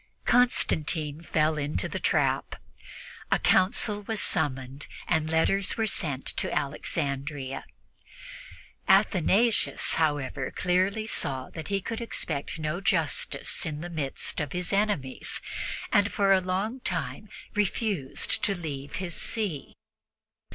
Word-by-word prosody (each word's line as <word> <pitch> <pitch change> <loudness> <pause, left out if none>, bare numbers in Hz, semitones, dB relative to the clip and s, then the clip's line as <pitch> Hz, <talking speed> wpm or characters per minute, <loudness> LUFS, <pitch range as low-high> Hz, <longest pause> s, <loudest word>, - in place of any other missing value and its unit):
Constantine 160 -11 +2
fell 155 -2 +1
into 145 +1 -1
the - - -4
trap. - - +1 0.8
A - - +5
council 205 +2 +3
was 215 +1 -3
summoned, 135 -6 -1 0.2
and 160 -2 +1
letters 185 +5 +2
were 225 - +2
sent 145 -10 -2
to - - -1
Alexandria. 140 -1 -2 1.2
Athanasius, 200 +3 +3
however, 145 -4 0
clearly 185 +4 +1
saw 130 - -1
that 160 - -7
he 200 -1 0
could 225 +4 -4
expect 160 -10 -3
no 155 +3 -2
justice 165 -7 +1
in 150 -1 -3
the 175 +1 -6
midst 145 -5 -2
of 150 -2 -3
his 180 +1 -3
enemies, 195 -11 0 0.5
and 205 +1 +4
for 200 -2 +4
a 190 - +4
long 195 +7 -2
time - - -3 0.2
refused 205 - 0
to 200 - +2
leave 145 -5 -6
his 175 -2 -3
see. 200 -11 -1
165 Hz, 120 wpm, -28 LUFS, 145-200 Hz, 1.2 s, A